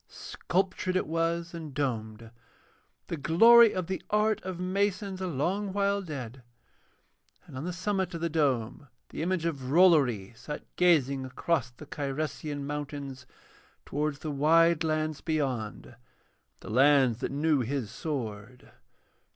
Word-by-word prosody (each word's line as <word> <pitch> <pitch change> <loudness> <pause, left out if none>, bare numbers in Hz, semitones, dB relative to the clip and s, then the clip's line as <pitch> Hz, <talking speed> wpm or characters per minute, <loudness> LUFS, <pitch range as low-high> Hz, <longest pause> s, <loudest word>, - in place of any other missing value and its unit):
Sculptured 185 0 -2
it 185 - +1
was 165 +1 -1
and 160 -5 -8
domed, 115 -5 -3 0.7
the 170 - -4
glory 225 +10 +7
of 185 -2 -3
the 190 +2 -4
art 210 0 +2
of 185 -2 -6
masons 195 +1 -1
a 185 - -2
long 185 +6 -1
while 200 0 +1
dead, 135 - -7 1.0
and - - -13
on 130 +5 -5
the 180 - -2
summit 190 0 -2
of 165 - -6
the 170 - +1
dome 145 -5 -1 0.2
the - - -6
image 175 0 -1
of 140 -6 -3
Rollory 140 - +4
sat 150 +5 -7
gazing 140 -7 +3
across 130 0 -1
the 125 +5 -13
Cyresian 145 0 -4
mountains 145 -2 -6 0.6
towards 150 0 -2
the 155 +1 -5
wide 165 +3 +4
lands 155 -2 -1
beyond, 135 -9 -3 0.7
the - - -8
lands 130 -1 +4
that - - -3
knew 150 +1 +1
his 125 -2 -3
sword. 125 -5 -6
155 Hz, 135 wpm, -28 LUFS, 135-180 Hz, 1.0 s, glory